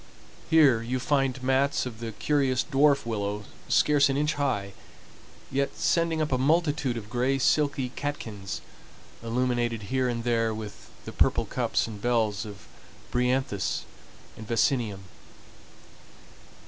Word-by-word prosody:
Here 145 -8 +5
you 120 +3 -2
find 135 -2 0
mats 135 +2 +2
of 115 -4 -7
the 115 -1 -5
curious 135 0 +1
dwarf 140 0 +3
willow 105 -2 -2 0.3
scarce 145 -1 +4
an 135 - 0
inch 150 +1 +1
high, 105 -9 -1 0.8
yet 140 +1 -1
sending 165 -2 +1
up 150 - -3
a 130 - +1
multitude 145 -3 +1
of 105 -3 -7
gray 125 +4 0
silky 140 -1 +1
catkins, 110 -8 -5 0.6
illumined 120 0 0
here 130 +5 0
and 115 -1 -3
there 115 -2 +1
with, 105 -2 -8 0.2
the - - -6
purple - - +2
cups - - 0
and 105 -3 -8
bells 110 -3 0
of 100 -2 -11 0.5
bryanthus 125 -5 0 0.5
and 110 - -10
vaccinium. 115 -4 +1
125 Hz, 130 wpm, -27 LUFS, 115-140 Hz, 0.8 s, Here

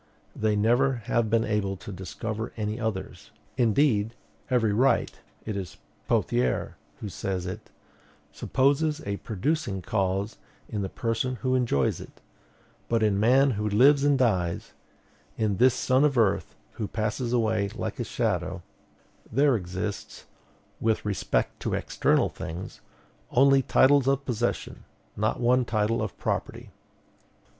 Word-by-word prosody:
They 110 -1 +1
never 120 +6 +3
have 115 -2 +1
been 115 +1 +3
able 105 -3 -1
to 100 - -9
discover 110 +4 -5
any 105 +1 -2
others. 110 -4 -4 0.3
Indeed, 115 -2 +2 0.3
every 115 -5 +2
right 130 +6 +2 0.3
it 110 - -3
is 95 -4 -6 0.3
Pothier 60 +1 0 0.3
who 105 - -4
says 90 +1 -3
it 90 - -7 0.6
supposes 150 +4 +1
a 100 0 -2
producing 105 - -2
cause 100 +2 -1 0.3
in 105 -3 -3
the 95 - -3
person 115 +4 -2
who 130 - +2
enjoys 120 - +1
it; - - -13 0.7
but 115 -1 +2
in 100 -2 +2
man 130 +5 +4
who 105 -1 -1
lives 140 +7 +5
and 145 -1 +4
dies, 95 -9 0 0.6
in 105 -3 0
this 125 +1 +5
son 130 +2 +2
of 145 -3 +2
earth 110 -4 +1 0.2
who 105 - -4
passes 110 +3 -2
away 110 -4 +1
like - - -4
a - - 0
shadow, - - -2 0.7
there 140 +3 +4
exists, 95 +1 -5 0.5
with 110 -1 0
respect 95 -11 -1
to - - -2
external - - +1
things, 85 +4 -7 0.5
only 135 +1 +5
titles 135 +1 +4
of 135 0 +1
possession, 120 -1 -2 0.3
not 110 +1 0
one 125 +1 +3
title 110 0 0
of 110 -3 -4
property. - - -3
110 Hz, 135 wpm, -27 LUFS, 100-130 Hz, 0.7 s, lives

